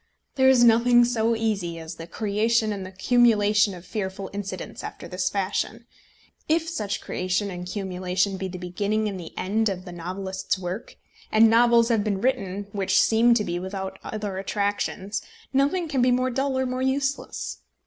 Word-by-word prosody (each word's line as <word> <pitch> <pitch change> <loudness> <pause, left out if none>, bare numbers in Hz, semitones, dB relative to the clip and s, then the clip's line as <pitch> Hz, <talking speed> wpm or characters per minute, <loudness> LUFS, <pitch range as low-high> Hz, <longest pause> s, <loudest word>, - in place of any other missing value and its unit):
There 265 -1 +4
is 255 -2 +6
nothing 240 +1 +6
so 230 -1 +1
easy 200 -7 -1
as 160 -1 -7
the 165 - -8
creation 215 +3 +1
and 195 -2 -5
the 185 - -8
cumulation 210 -1 +3
of 175 0 -12
fearful 190 -1 -4
incidents 195 -2 -6
after - - -7
this 185 0 -1
fashion. 205 +4 -2 0.6
If 325 +1 +2
such 215 -11 -3
creation 185 +2 -2
and 180 0 -6
cumulation 185 0 -1
be 190 - -3
the 185 0 -7
beginning 200 +4 -1
and 195 -3 -4
the 165 - -8
end 215 +3 +1
of 185 -1 -5
the 180 - -8
novelist's 190 +3 -3
work, 185 +5 -6 0.4
and 220 +1 +6
novels 235 0 +5
have 225 -3 +2
been 200 -2 -1
written 200 -5 -1
which 190 -2 +2
seem 235 +1 +5
to 215 - +1
be 175 -2 -2
without 190 +1 -5
other 205 -3 -4
attractions, 205 0 -2 0.3
nothing 290 +6 +2
can 275 -5 0
be 250 - +4
more 255 +1 +2
dull 265 +1 0
or 260 - +1
more 255 0 -2
useless. 270 +1 -2
205 Hz, 175 wpm, -25 LUFS, 190-235 Hz, 0.6 s, is